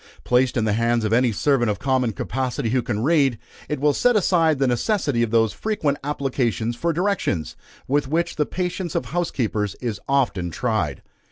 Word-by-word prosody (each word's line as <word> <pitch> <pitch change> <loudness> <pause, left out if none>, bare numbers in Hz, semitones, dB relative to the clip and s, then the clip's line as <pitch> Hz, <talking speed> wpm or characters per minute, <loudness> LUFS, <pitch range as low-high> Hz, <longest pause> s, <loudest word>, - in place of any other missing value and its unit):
Placed 125 +1 +2
in 115 - +2
the 105 - +1
hands 115 +1 +1
of 110 - 0
any 125 0 +3
servant 120 +1 +1
of 105 - -1
common 130 -1 +1
capacity, 125 0 -2
who 130 0 +2
can 115 -3 -2
read, 140 -5 +3 0.3
it 150 - -2
will 145 +1 +3
set 245 +8 +3
aside 165 -6 +3
the 135 - +2
necessity 130 - 0
of 120 - +1
those 115 -1 +2
frequent 155 -10 -1
applications 125 -6 -1
for 170 +8 0
directions, 170 - -1 0.3
with 140 +1 +1
which 165 +4 -1
the 150 - 0
patience 180 -1 -3
of - - 0
housekeepers 115 - -2
is 115 -5 -4
often 120 -10 +1
tried. 100 - -2
130 Hz, 180 wpm, -22 LUFS, 115-150 Hz, 0.3 s, any